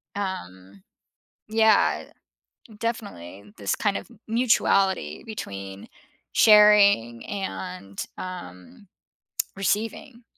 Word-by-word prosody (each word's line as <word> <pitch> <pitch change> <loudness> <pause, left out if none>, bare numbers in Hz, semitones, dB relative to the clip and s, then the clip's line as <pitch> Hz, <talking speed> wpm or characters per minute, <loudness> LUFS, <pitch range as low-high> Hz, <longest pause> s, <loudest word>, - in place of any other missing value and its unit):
Um 95 - -6 0.7
yeah, 220 -1 +3 0.7
definitely 105 - -6
this 100 -1 -1
kind 205 -2 0
of - - -12 0.2
mutuality 195 - +1
between 100 - -7 0.4
sharing 205 - +5
and, 95 - -5 0.2
um, 180 - -9 0.7
receiving. 225 +5 -2
190 Hz, 70 wpm, -25 LUFS, -, 0.7 s, sharing